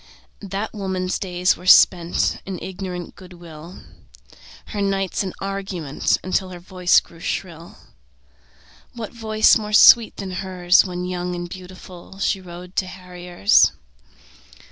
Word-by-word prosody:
That 200 +2 -5
woman's 190 -3 -3
days 180 -1 0
were 180 - -12
spent 175 -2 +4
In 190 -2 -4
ignorant 180 -2 -7
good 185 -1 -14
will, 170 0 -12 0.9
Her 205 - -4
nights 195 -1 -1
in 190 -2 -3
argument 195 -7 -2
Until 185 0 -1
her 180 -1 -9
voice 180 0 +2
grew 165 - -17
shrill. 170 -1 -6 1.2
What 230 -2 -7
voice 220 -1 +3
more 210 0 -6
sweet 230 +1 +7
than 195 -2 -6
hers 180 -1 +3
When 180 -1 -5
young 180 0 -4
and 175 0 -5
beautiful, 185 0 -12
She 195 -1 -1
rode 180 0 -11
to 185 - 0
harriers? 180 - +1
185 Hz, 130 wpm, -21 LUFS, 175-195 Hz, 1.2 s, sweet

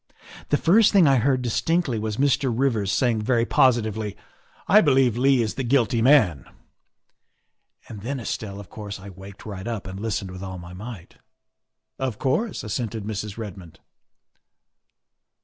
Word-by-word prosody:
The 145 - +3
first 205 +8 +4
thing 195 -5 +5
I 135 -1 +5
heard 130 +1 +1
dis 120 -3 -1
tinctly 165 -10 0
was 110 -1 -3
Mr. 140 -1 +2
Rivers 115 -5 0
saying 120 -4 +1
very 115 +1 +1
positively, 110 -5 +1 0.3
' - - -31
I 210 +2 +7
believe 135 - +3
Leigh 130 0 +3
is 110 - -3
the 135 - -4
guilty 120 -2 +2
man,' 115 - +4 1.4
and 105 -3 -9
then, 135 +5 -4
Estelle, 100 -4 -5
of 100 - -10
course 105 -2 -7
I 100 +1 -10
waked 95 +2 -12
right 100 -1 -7
up 115 -4 -4
and 95 0 -7
listened 100 -3 -3
with 95 0 -9
all 95 -1 -6
my 85 0 -10
might. 105 -1 -10 0.2
' - - -59
' - - -60
" - - -56
Of 110 - -10
course," 195 - -1
assented 110 0 -4
Mrs. 105 0 -5
Redmond. 95 -7 -9
115 Hz, 170 wpm, -24 LUFS, 100-130 Hz, 1.4 s, I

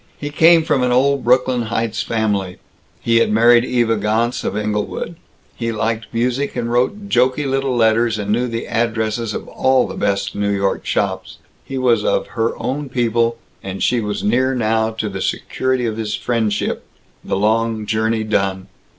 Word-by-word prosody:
He 145 0 -5
came 165 +2 +5
from 150 -5 +1
an 125 0 +1
old 135 +2 +2
Brooklyn 125 -1 +2
Heights 115 -1 -1
family. 100 -5 -1 0.4
He 115 0 +2
had 115 - +3
married 120 +2 +5
Eva 120 -3 +1
Gontz 110 +4 0
of 105 - -2
Englewood. 105 +9 -3 0.4
He 115 -1 -2
liked 115 +1 -2
music 125 +4 -1
and 120 -1 -2
wrote 200 +13 0
jokey 130 -1 +2
little 135 -1 0
letters 115 -1 +2
and 105 -1 -3
knew 120 +3 +1
the 115 -1 -4
addresses 110 -1 -1
of - - -6
all 130 -1 +2
the - - -6
best 100 0 -1
New 100 0 -1
York 100 -1 -1
shops. - - -2 0.3
He 135 - -6
was 120 -4 +2
of - - 0
Her 115 -1 -1
Own 140 +1 -3
People, 115 -2 +1 0.2
and 95 0 -5
she 125 - +2
was 105 -2 -3
near 130 +5 +2
now 110 -1 +1
to 110 -1 -4
the 95 -2 -5
security 130 -1 -1
of 110 -1 -2
his 110 -2 -2
friendship, 110 -4 -1 0.4
the - - -2
long 110 +1 +1
journey 110 +1 0
done. 95 -3 -1
115 Hz, 175 wpm, -19 LUFS, 110-125 Hz, 0.4 s, came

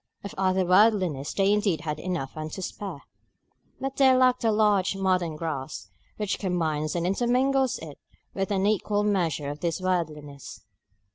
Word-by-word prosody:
Of 200 - -7
other 190 -1 +1
worldliness 180 -7 +3
they 195 +1 +2
indeed 200 -7 +1
had 155 -2 -4
enough 170 -7 -3
and 155 0 -5
to 190 - -5
spare; 180 -6 -6 0.8
but 270 0 -4
they 265 -2 +6
lacked 255 -1 +3
the 225 - +2
large 210 -3 +2
modern 185 -4 0
grasp 140 - -5 0.3
which 210 -2 -2
combines 160 -5 -1
and 170 0 -1
intermingles 255 +6 +1
it 155 -3 -10 0.3
with 195 +1 -2
an 195 -1 +1
equal 205 0 +1
measure 170 -8 0
of 145 - -8
this 170 +1 -1
worldliness. 150 -6 -3
185 Hz, 155 wpm, -26 LUFS, 155-210 Hz, 0.8 s, they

